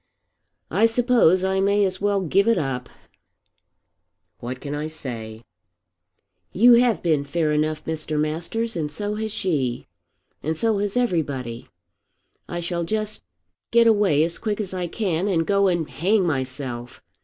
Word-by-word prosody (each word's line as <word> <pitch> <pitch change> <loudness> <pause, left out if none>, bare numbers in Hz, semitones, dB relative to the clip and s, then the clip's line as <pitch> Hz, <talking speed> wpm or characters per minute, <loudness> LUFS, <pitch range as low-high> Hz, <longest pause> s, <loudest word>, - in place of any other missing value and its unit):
"I 225 - +4
suppose 230 -6 +3
I 190 0 +1
may 200 +1 +3
as 190 0 -3
well 200 -1 +1
give 190 +4 +2
it 230 - +4
up." 130 -3 -3 1.5
"What 125 +2 -6
can 145 +1 -6
I 150 +1 -3
say?" 115 -7 -7 1.1
"You 240 +5 +6
have 235 -1 +3
been 155 -5 +2
fair 155 +2 -1
enough, 155 0 -1
Mr. 155 -1 -2
Masters. 170 +10 -2
And 150 -3 -2
so 205 +7 -3
has 220 0 -3
she. 140 - -1 0.6
And 160 +1 -2
so 220 +2 +2
has 205 +3 -1
everybody. 145 - -1 0.8
I 175 - -3
shall 170 0 -2
just 215 +4 -2 0.5
get 235 0 +5
away 205 -9 +4
as 170 +1 -2
quick 215 -2 -2
as 195 -3 -4
I 180 -1 -2
can, 180 -1 -1
and 165 -5 +1
go 200 +1 +3
and 170 -4 0
hang 195 +4 +1
myself. 130 -4 -4
175 Hz, 150 wpm, -23 LUFS, 150-205 Hz, 1.5 s, You